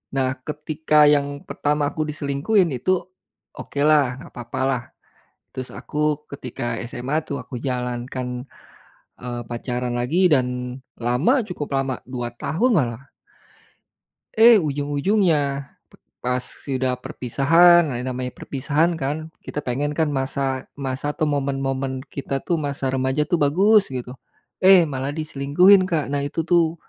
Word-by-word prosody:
Nah 130 -1 +1
ketika 150 +1 +2
yang 145 -1 +2
pertama 150 0 0
aku 155 - -3
diselingkuhin 150 +5 +1
itu, 185 +10 +1 0.6
okelah 145 -3 +2
gapapalah, 120 +1 -3 0.6
terus 130 -1 -5
aku 150 0 -1 0.2
ketika 125 -2 -4
SMA 130 +6 -2
tuh 140 -2 -5
aku 125 -1 -7
jalan 125 -1 -3
kan, 125 0 -5 0.7
eee, 120 -1 -4
pacaran 120 +1 -3
lagi 140 +10 +2
dan 140 -7 +3 0.5
lama 145 - +2
cukup 160 -6 -5
lama 135 -1 -2
2 120 -2 -4
tahun 155 - 0
malah. 120 - 0 1.4
Eh, 225 -2 +8
ujung-ujungnya 145 -1 0 0.5
p - - -14
pas 125 0 +1
sudah 130 -2 -3
perpisahan 165 +9 +4
nah 135 - -3
yang 125 +2 -3
namanya 125 0 -4
perpisahan 150 +5 0
kan 155 +3 -3
kita 150 - -6
pengen 145 +4 -2
kan 160 -2 +1
masa 135 -1 -2
masa 140 +1 -3
atau - - -2
momen-momen 135 -2 -2
kita 135 -1 -3
tuh 170 -2 0
masa 140 -3 -2
remaja 130 +3 +1
tuh 175 - +3
bagus 195 +9 +4
gitu, 125 -1 -5 0.5
eh, 185 -1 +7
malah 135 +1 -3
diselingkuhin 160 +6 +4
Kak, 160 -6 -1
nah 145 - 0
itu 165 +3 -2
tuh, 170 -1 +2
140 Hz, 130 wpm, -22 LUFS, 130-155 Hz, 1.4 s, Eh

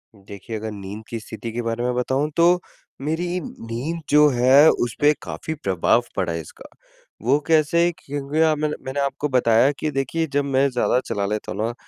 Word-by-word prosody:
देखिए, 100 +2 -9
अगर 110 +1 -5
नींद 100 +1 -8
की 115 - -4
स्थिति 110 +1 -7
के 120 +2 -3
बारे 115 0 -2
में 125 0 0
बताऊँ 130 +4 0
तो 175 +1 +5 0.4
मेरी 175 +5 -2
नींद 130 +6 -5
जो 150 +1 +6
है, 130 +4 +6
उस 120 -2 -1
पे 145 +1 +6
काफ़ी 160 - -5
प्रभाव 95 +5 +2
पड़ा 90 -3 -1
है 85 - -3
इसका। 75 - -14 0.6
वो 135 +4 +4
कैसे? 165 +2 +3
क्योंकि 145 +2 -3
अ, 160 -1 +4
मैंने 150 0 -2
मैंने 130 +2 -3
आपको 140 +1 -1
बताया 125 0 +4
कि 155 - -1
देखिए, 140 +4 -1
जब 145 0 +1
मैं 135 0 +2
ज़्यादा 125 0 +1
चला 100 -1 -2
लेता 105 +1 -3
हूँ 100 +4 -4
ना, 115 +2 -1
130 Hz, 190 wpm, -22 LUFS, 115-150 Hz, 0.6 s, जो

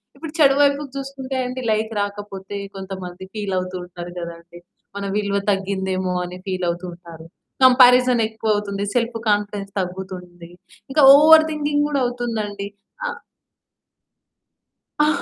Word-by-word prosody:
ఇప్పుడు 320 -2 -8
చెడు 275 -2 +6
వైపుకు 285 0 +2
చూసుకుంటే 270 -1 -5
అండి, 255 +1 -5
లైక్ 220 +1 0
రాకపోతే 205 -1 -6 0.2
కొంతమంది 190 -1 -7
ఫీలవుతూ 185 -3 -2
ఉంటారు 175 0 -9
గదండి, 170 0 -9 0.4
మన 200 - -4
విలువ 200 -1 0
తగ్గిందేమో! 190 -1 -1
అని 180 +1 -8
ఫీలవుతూ 180 -1 -2
ఉంటారు. 170 -2 -13 0.4
కంపారిజనెక్కువవుతుంది 225 -5 +4
సెల్ఫ్ 235 -1 0
కాన్ఫిడెన్స్ 205 -1 -1
తగ్గుతుంది. 180 -2 -7 0.4
ఇంక 295 - +1 0.2
ఓవర్ 315 +2 +8
థింకింగ్ 295 -1 0
గూడా 285 -2 0
అవుతుందండి. 220 -5 -3 0.4
ఆ! - - 0 1.9
ఆ! 300 - +5
205 Hz, 110 wpm, -21 LUFS, 185-250 Hz, 1.9 s, ఓవర్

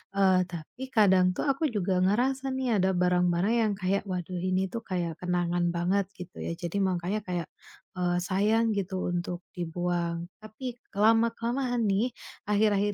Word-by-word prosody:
eee, 190 -2 +4
tapi 170 - -8
kadang 190 -4 +5
tuh - - -2
aku 275 +4 +1
juga 195 -5 0
ngerasa 260 +7 +1
nih 255 -5 +1
ada 190 0 +3
barang-barang 180 +3 +2
yang 220 -3 +2
kayak, 195 +1 0
"Waduh 180 -1 -3
ini 185 +1 0
tuh 230 +5 -4
kayak 175 -4 -2
kenangan 175 -1 0
banget." 180 +3 +1
Gitu 180 0 -10
ya. 170 - -3
Jadi, 175 +2 -4
mangkanya 185 +3 -1
kayak, 175 -3 -3 0.5
eee, 175 -1 +1
sayang 210 +5 +2
gitu 190 -1 -2
untuk 175 0 -2 0.2
dibuang, 175 0 -2 0.2
tapi 230 +3 -6 0.2
ke 200 - -13
lama-kelamaan 230 +3 +2
nih, 205 +6 +1 0.4
akhir-akhir 205 -1 +3
190 Hz, 155 wpm, -28 LUFS, 175-215 Hz, 0.5 s, kadang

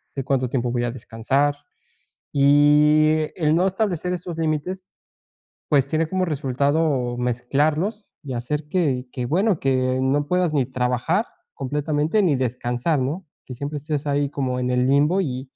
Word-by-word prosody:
de 135 - -3
cuánto 130 -2 0
tiempo 125 -2 -1
voy 120 0 -1
a 120 - -1
descansar. 130 +4 -1 0.8
Y 150 +2 +4
el 155 -3 +2
no 175 +2 +3
establecer 185 -3 -1
esos 175 -1 -5
límites, 165 +4 -2 0.8
pues, 140 -2 +3
tiene 160 +2 0
como 185 +1 0
resultado 140 -2 0
mezclarlos 145 - -1 0.2
y 135 -3 -5
hacer 145 +5 -3
que 145 -7 0
que, 125 - -3
bueno, 185 - +1
que 130 -1 +1
no 140 +2 +1
puedas 180 0 +1
ni 140 -4 +1
trabajar 130 - 0 0.3
completamente, 150 +7 0
ni 155 -7 +2
descansar, 125 +4 -1
¿no?, 150 +9 -3 0.2
que 130 - -7
siempre 145 +4 -4
estés 150 0 -4
ahí 145 0 +1
como 130 -3 -2
en 125 - -1
el 125 0 +2
limbo 150 +7 +3
y 130 -6 -4
145 Hz, 155 wpm, -22 LUFS, 130-160 Hz, 0.8 s, Y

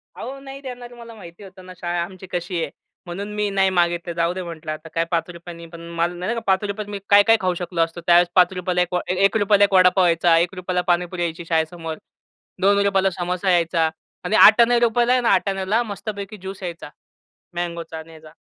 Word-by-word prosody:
अहो, 270 +1 -7
नाही 275 0 -10
देणार 245 -2 -9
मला 235 -1 -12
माहिती 175 -2 -13
होतं 185 -1 -14
ना, 185 - -10
शाळा 175 -1 -2
आमची 185 +1 -10
कशी 175 -1 -3
आहे? - - -3 0.4
म्हणून 195 +4 -6
मी 210 0 0
नाही 195 -1 +2
मागितलं, 175 -1 0
जाऊदे 170 +2 -1
म्हटलं 165 -3 -7
आता 155 +1 -8
काय 165 0 +1
₹5 170 +1 -4
नी 170 - -10
पण 165 0 -12
मला 170 +1 0
नाही 180 +6 -3
का, - - -2
₹5 200 +2 0
त - - -13
मी 205 -1 -5
काय-काय 205 +3 +6
खाऊ 185 -1 +1
शकलो 175 -1 -2
असतो? 165 +1 -2
त्यावेळेस 175 0 +6
₹5 180 0 +2
ला 180 - +2
एक 180 0 -2
व 180 - +2
ए - - 0
₹1 205 0 +3
ला 205 - +4
1 200 - +2
वडापाव 185 0 +5
यायचा, 165 0 +3
₹1 180 +2 -2
ला 180 - +1
पाणीपुरी 175 +1 -1
यायची 170 0 -4
शाळेसमोर. 160 0 -2 0.7
₹2 200 0 +3
ला 195 - +2
समोसा 180 +2 -1
यायचा 165 -2 +2 0.3
आणि 220 - -1
आठाण्या 235 +3 +7
रुपयाला, 240 +1 +2
आहे 255 - +2
ना, 240 - +1
आठाण्याला 195 +3 +1
मस्तपैकी 205 -1 -7
ज्यूस 190 0 -9
यायचा. 175 -1 -6 0.7
मँगोचा 170 -2 -5
आणि 160 +1 -11
ह्याचा. 155 -1 -14
180 Hz, 210 wpm, -21 LUFS, 170-200 Hz, 0.7 s, आठाण्या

